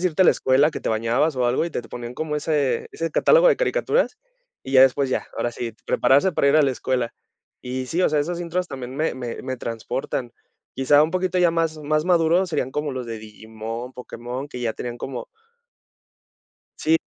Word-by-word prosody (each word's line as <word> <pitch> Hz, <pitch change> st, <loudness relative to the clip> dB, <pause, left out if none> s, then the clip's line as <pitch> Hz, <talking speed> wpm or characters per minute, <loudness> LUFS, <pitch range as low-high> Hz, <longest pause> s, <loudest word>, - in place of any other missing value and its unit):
antes -, -, -7 dB
de 185 Hz, -, +3 dB
irte 170 Hz, +2 st, +2 dB
a -, -, +4 dB
la -, -, +8 dB
escuela, 135 Hz, +4 st, +3 dB
que -, -, -6 dB
te -, -, -3 dB
bañabas 115 Hz, +7 st, +1 dB
o 125 Hz, -, +1 dB
algo, 120 Hz, +7 st, +1 dB
y 170 Hz, -, -6 dB
te 125 Hz, -, -3 dB
te -, -, -16 dB
ponían 120 Hz, 0 st, -6 dB
como 155 Hz, +1 st, -2 dB
ese 145 Hz, -5 st, 0 dB
ese 165 Hz, 0 st, -3 dB
catálogo -, -, +5 dB
de -, -, +4 dB
caricaturas, -, -, +1 dB, 0.5 s
y 135 Hz, -, -7 dB
ya 130 Hz, -, +7 dB
después 135 Hz, +1 st, +4 dB
ya, -, -, -1 dB
ahora 120 Hz, -, -1 dB
sí, 120 Hz, -1 st, -5 dB
prepararse 145 Hz, +8 st, +3 dB
para 140 Hz, -, +2 dB
ir 145 Hz, -, +5 dB
a 155 Hz, -, +6 dB
la 135 Hz, -, +3 dB
escuela. 125 Hz, -2 st, -1 dB, 0.5 s
Y 130 Hz, +1 st, -4 dB
sí, 170 Hz, +7 st, -1 dB
o -, -, +4 dB
sea, 150 Hz, -, +1 dB
esas 175 Hz, +3 st, -3 dB
intros 175 Hz, +1 st, -2 dB
también 130 Hz, -3 st, -7 dB
me 155 Hz, +2 st, 0 dB
me 125 Hz, -2 st, -6 dB
me 130 Hz, -1 st, -4 dB
transportan. 120 Hz, +2 st, -4 dB, 0.4 s
Quizá 145 Hz, +3 st, +5 dB
un 155 Hz, -, +1 dB
poquito 185 Hz, 0 st, -1 dB
ya 175 Hz, -1 st, +4 dB
más 165 Hz, -1 st, 0 dB
más 155 Hz, +3 st, 0 dB
maduro 175 Hz, +1 st, +3 dB
serían 150 Hz, -6 st, -2 dB
como 150 Hz, 0 st, -2 dB
los 130 Hz, -1 st, -4 dB
de 115 Hz, -1 st, -6 dB
Digimon, 110 Hz, +3 st, -8 dB
Pokémon, 125 Hz, +2 st, -7 dB
que 125 Hz, -, -7 dB
ya 115 Hz, -2 st, -1 dB
tenían 120 Hz, +1 st, -6 dB
como 135 Hz, -, -6 dB, 1.5 s
Sí, 160 Hz, +1 st, +3 dB
135 Hz, 220 wpm, -23 LUFS, 125-165 Hz, 1.5 s, la